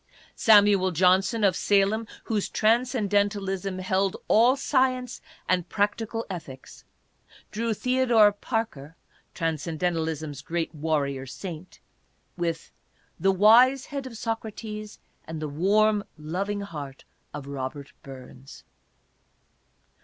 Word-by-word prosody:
Samuel 205 -3 +5
Johnson, 185 +5 +2
of 190 -3 +4
Salem, 205 +3 +1 0.2
whose 215 -3 -2
Transcendentalism 205 -5 0
held 190 +1 0
all 240 +4 +5
science 255 -3 0 0.3
and 180 -1 0
practical 225 +2 -1
ethics, 150 -8 -9 0.7
drew 230 +2 -2
Theodore 245 -4 +4
Parker 205 - -4 0.2
— - - -36
Transcen 165 -1 -2
dentalism's 160 -4 -2
great 165 +3 -3
warrior 145 -4 -2
saint 175 +4 -8 0.3
— - - -43
with 165 -1 -4 0.2
" - - -39
the 195 - +3
wise 235 +7 +5
head 280 -2 -5
of 230 -3 -9
Socrates 215 -1 -5 0.3
and 160 0 -6
the 155 - -3
warm, 205 +7 +2
loving 190 +7 -3
heart 145 -8 -8 0.3
of 145 -2 -7
Robert 140 0 -6
Burns." 130 0 -12
195 Hz, 110 wpm, -26 LUFS, 160-220 Hz, 0.7 s, Samuel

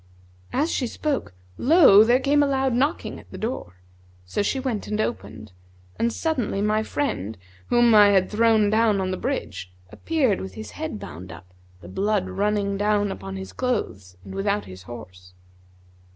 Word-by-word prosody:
As 300 +5 0
she 255 - -1
spoke 280 - -3 0.3
lo! 270 - +7
there 240 +3 +4
came 285 +2 +3
a 290 - +3
loud 265 -2 +1
knocking 280 +6 -1
at - - -17
the - - -9
door; 220 - -4 0.5
so 90 - -2
she 265 +6 0
went 250 -6 -3
and 210 0 -2
opened, 215 - -4 0.5
and 235 - +1
suddenly, 260 -9 -1
my 210 +1 +1
friend, 110 - -3 0.3
whom 240 -1 +4
I 210 -1 +8
had 190 -2 +3
thrown 220 -1 +3
down 220 -2 +3
on 185 -1 -1
the - - -1
bridge, 215 - -4 0.2
appeared 280 -11 0
with 95 0 -8
his 110 -1 -8
head - - -5
bound 90 +4 -9
up, 90 0 -13 0.3
the 85 - -12
blood 200 - 0
running 200 -1 0
down 205 0 +1
upon 95 0 -7
his 95 0 -7
clothes 100 - -3
and 95 - -9
without 100 +1 -1
his 95 -1 -11
horse. 90 -6 -11
210 Hz, 170 wpm, -24 LUFS, -, 0.5 s, I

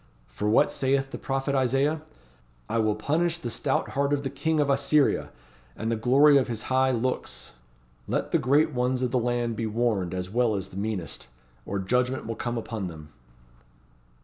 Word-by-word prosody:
For 105 - -2
what 110 - +4
saith 135 0 0
the - - -6
prophet 135 +1 -2
Isaiah? 135 +4 +1 0.7
'I - - -1
will 110 -1 +2
punish 165 +9 0
the 120 -9 -5
stout 135 +3 -1
heart 140 +1 0
of 140 -1 0
the 135 - -3
King 160 +3 0
of 145 - +2
Assyria, 140 +1 +2 0.5
and 110 +1 -2
the - - +2
glory 140 +6 +5
of 130 - -1
his 115 -3 -4
high 130 0 +4
looks.' 125 0 -2 0.6
Let - - -1
the - - +3
Great 145 +5 +3
Ones 125 +1 0
of 125 - 0
the 125 - +2
land 120 -1 -1
be 115 0 -2
warned 105 -5 0
as 90 -1 -3
well 115 +2 +1
as 95 -1 -4
the - - -13
meanest, 100 - -3 0.4
or 100 - -2
judgment 125 +7 0
will 115 - -3
come 120 +1 -3
upon 110 -4 -4
them." 80 -3 -10
125 Hz, 185 wpm, -26 LUFS, 110-135 Hz, 0.7 s, glory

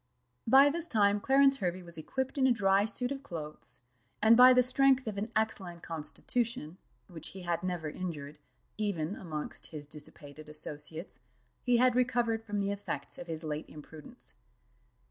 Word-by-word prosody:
By 275 +4 +7
this 340 +2 -2
time 205 -6 +3
Clarence 270 +1 +4
Hervey 180 -3 -2
was 170 -1 -12
equipped 265 - -3
in 265 - +5
a - - +4
dry 200 -3 +3
suit 245 +4 0
of 275 -1 -4
clothes; 150 - -8 0.4
and 220 +2 +6
by 250 +2 +9
the 250 0 +6
strength 265 +1 +4
of 215 -3 -4
an 210 +3 -4
excellent 190 -6 -1
constitution, 170 +3 -3 0.3
which 165 -4 -6
he - - -7
had 175 -1 -1
never 180 -4 -3
injured, 150 -3 -6 0.4
even 195 -4 -1
amongst 155 -5 -6
his 150 -2 -8
dissipated 150 0 -9
associates, 150 +2 -6 0.4
he 245 -1 +3
had 250 0 +4
recovered 240 -3 +1
from 210 -2 -4
the 200 0 0
effects 200 0 -5
of 175 - -8
his 160 -1 -4
late 150 0 -4
imprudence. 150 0 -10
195 Hz, 165 wpm, -31 LUFS, 160-245 Hz, 0.4 s, by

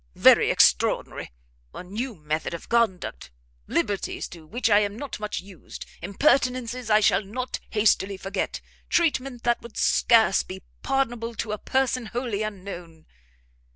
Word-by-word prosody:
"Very - - +6
extraordinary! - - +2 0.4
a - - -6
new 220 +6 -4
method 155 +1 -3
of 170 - -10
conduct! 220 - 0 0.4
liberties 195 +3 -1
to 165 -3 -12
which 240 +8 -1
I 205 -2 +6
am 205 0 -1
not 280 -2 -6
much 210 -3 -3
used! 190 -2 -11 0.2
impertinences 250 - +1
I 215 0 +5
shall 200 - +4
not 250 +6 -4
hastily 200 -2 +2
forget, 195 0 -3 0.3
treatment 270 -7 +1
that 240 -1 +1
would 235 -2 -11
scarce 225 -5 +4
be 190 0 -9 0.2
pardonable 240 -4 -1
to 220 - -3
a 210 - -3
person 260 -3 0
wholly 235 -3 -3
unknown! 180 -6 -7
215 Hz, 140 wpm, -25 LUFS, 195-245 Hz, 0.4 s, Very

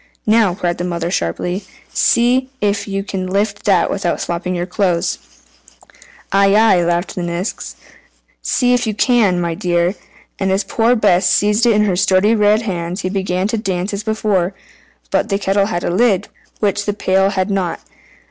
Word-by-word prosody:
"Now," 215 -4 +3
cried 175 -3 -2
the - - -2
mother 170 -1 -3
sharply, 175 - -2 0.3
"see 250 +2 +2
if 200 0 -1
you 195 0 -3
can 190 -2 -4
lift 200 +2 -1
that 190 -4 +3
without 185 -3 -1
slopping 180 +1 -3
your 175 0 -2
clothes." 180 -2 -1 1.1
"Aye, 195 0 +4
aye," 215 -5 +4
laughed 175 +2 -1
the 180 - -4
Nix, 175 +3 -4 0.7
"see 250 -1 +1
if 245 -1 +1
you 215 - -2
can, 215 -7 +2
my 170 -1 -1
dear!" 175 +1 0 0.5
and 190 -1 0
as 195 +2 +1
poor 230 +4 +1
Bess 185 -5 +3
seized 210 +5 +2
it 230 - +4
in 210 0 +3
her 190 -3 +1
sturdy 190 +3 +3
red 210 0 +3
hands 180 -2 -4
he 185 - -2
began 190 -1 -1
to 225 - -1
dance 190 -1 -3
as 200 - -3
before. 210 -4 -1 0.6
But - - 0
the 195 - +1
kettle 195 0 +1
had 175 -5 -3
a - - -1
lid, 200 0 +1 0.3
which 205 -1 0
the 205 - +1
pail 195 -1 +1
had 195 0 -1
not. 190 -3 -1
195 Hz, 175 wpm, -17 LUFS, 180-210 Hz, 1.1 s, Aye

